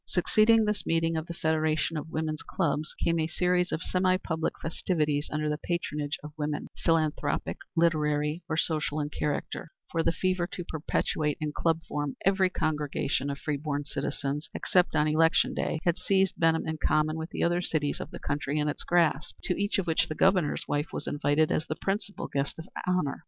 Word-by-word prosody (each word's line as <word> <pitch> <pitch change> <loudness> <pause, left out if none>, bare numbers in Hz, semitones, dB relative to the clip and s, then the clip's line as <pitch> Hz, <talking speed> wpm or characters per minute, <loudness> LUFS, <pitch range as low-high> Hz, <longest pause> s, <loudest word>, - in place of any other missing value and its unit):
Succeeding 215 +4 +4
this 210 -1 -1
meeting 165 0 +1
of 160 +1 -2
the 170 - -5
Federation 160 0 +1
of 155 +1 -4
Women's 155 -1 -2
Clubs 155 -4 -1
came 170 0 +2
a 160 - +1
series 180 +1 +1
of 160 - -2
semi 185 0 +2
public 160 -3 -2
festivities 155 -3 0
under 155 0 -1
the 150 0 -1
patronage 150 -4 -2
of 150 0 -8
women 150 0 -2
philanthropic, 155 -3 +1 0.2
literary 150 -1 +2
or 160 - 0
social 155 -2 0
in 145 0 -2
character 150 +2 -3 0.2
for 165 - +1
the 165 - +3
fever 185 0 0
to 180 - -4
perpetuate 155 -1 -1
in 150 -1 -2
club 165 +2 +1
form 145 -2 -2
every 190 -1 +4
congregation, 150 -4 -1
of 140 - -3
free 150 0 -2
born 145 0 -3
citizens, 145 +1 -3
except 180 -3 +2
on 150 0 +3
election 160 +2 +3
day, - - -1
had 170 +1 +2
seized 195 -1 +2
Benham 165 -1 +2
in 160 -1 -3
common 155 0 +2
with 160 +1 -4
the - - -2
other 175 +1 +2
cities 150 -4 -1
of - - -5
the - - -8
country 145 0 -2
in 150 0 +1
its 150 - -3
grasp, 165 -4 +2
to 180 - 0
each 205 +2 +1
of 195 - 0
which 165 +1 +2
the 155 - -3
Governor's 185 -5 +2
wife 145 +2 0
was - - -4
invited 145 +1 +2
as 155 - 0
the 155 - -2
principal 200 +5 -3
guest 140 0 -2
of 160 - -8 0.2
honor. 180 -6 +1
160 Hz, 195 wpm, -28 LUFS, 150-175 Hz, 0.2 s, Succeeding